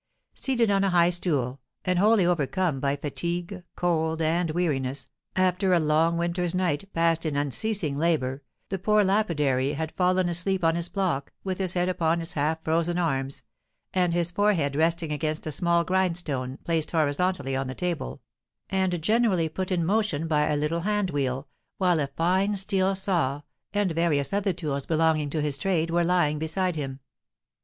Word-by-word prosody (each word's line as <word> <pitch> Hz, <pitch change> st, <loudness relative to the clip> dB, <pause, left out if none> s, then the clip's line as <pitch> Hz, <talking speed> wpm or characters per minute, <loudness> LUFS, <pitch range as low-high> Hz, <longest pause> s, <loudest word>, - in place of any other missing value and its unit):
Seated 240 Hz, -5 st, +1 dB
on 195 Hz, 0 st, +2 dB
a 195 Hz, -, +2 dB
high 175 Hz, -1 st, +4 dB
stool, 140 Hz, -7 st, 0 dB, 0.3 s
and 180 Hz, -1 st, +1 dB
wholly 210 Hz, -1 st, +4 dB
overcome 170 Hz, -2 st, 0 dB
by 140 Hz, +1 st, 0 dB
fatigue, 175 Hz, +6 st, -4 dB
cold, 160 Hz, -2 st, 0 dB
and 165 Hz, +2 st, +1 dB
weariness, 140 Hz, -6 st, -1 dB, 0.3 s
after 185 Hz, 0 st, +2 dB
a -, -, +4 dB
long 160 Hz, +2 st, +2 dB
winter's 175 Hz, +1 st, -1 dB
night, 185 Hz, 0 st, -1 dB
passed 165 Hz, 0 st, +2 dB
in 155 Hz, -3 st, -2 dB
unceasing 150 Hz, -, -1 dB
labour, 145 Hz, -5 st, 0 dB, 0.3 s
the 195 Hz, -, -3 dB
poor 210 Hz, +3 st, +3 dB
lapidary 150 Hz, -10 st, +1 dB
had 160 Hz, +2 st, -3 dB
fallen 185 Hz, 0 st, +2 dB
asleep 180 Hz, +2 st, -1 dB
on 165 Hz, 0 st, +4 dB
his 170 Hz, +1 st, -2 dB
block, 180 Hz, -9 st, -1 dB
with 190 Hz, -1 st, -3 dB
his 185 Hz, -2 st, 0 dB
head 180 Hz, 0 st, +1 dB
upon 170 Hz, -2 st, +1 dB
his 165 Hz, +1 st, -4 dB
half 160 Hz, +2 st, -1 dB
frozen 170 Hz, +2 st, 0 dB
arms, 135 Hz, -6 st, -2 dB, 0.5 s
and 180 Hz, -2 st, +2 dB
his 170 Hz, 0 st, 0 dB
forehead 175 Hz, -8 st, +1 dB
resting 165 Hz, +1 st, +1 dB
against 155 Hz, +1 st, -2 dB
a 155 Hz, -, -3 dB
small 170 Hz, +3 st, +2 dB
grindstone, 170 Hz, -8 st, -1 dB
placed 165 Hz, -2 st, 0 dB
horizontally 155 Hz, -2 st, 0 dB
on 135 Hz, 0 st, -2 dB
the 130 Hz, -, -5 dB
table, 175 Hz, -, -3 dB, 0.5 s
and 185 Hz, -3 st, 0 dB
generally 215 Hz, -5 st, +2 dB
put 185 Hz, +4 st, -4 dB
in 170 Hz, -3 st, +1 dB
motion 195 Hz, -5 st, 0 dB
by 150 Hz, -2 st, +2 dB
a 150 Hz, -, +1 dB
little 150 Hz, +3 st, 0 dB
hand 205 Hz, -1 st, 0 dB
wheel, 135 Hz, -1 st, -2 dB, 0.3 s
while 180 Hz, -4 st, +2 dB
a 140 Hz, -, 0 dB
fine 185 Hz, +8 st, +1 dB
steel 195 Hz, 0 st, +2 dB
saw, 170 Hz, -8 st, 0 dB, 0.3 s
and 205 Hz, -3 st, +1 dB
various 160 Hz, -2 st, +1 dB
other 200 Hz, 0 st, +1 dB
tools 150 Hz, -6 st, -4 dB
belonging 160 Hz, -2 st, +2 dB
to 155 Hz, +1 st, -2 dB
his 145 Hz, -2 st, -1 dB
trade, 165 Hz, -2 st, 0 dB
were 175 Hz, +1 st, +2 dB
lying 170 Hz, -4 st, +2 dB
beside 175 Hz, +3 st, -1 dB
him. 135 Hz, -3 st, -4 dB
170 Hz, 170 wpm, -26 LUFS, 150-185 Hz, 0.5 s, high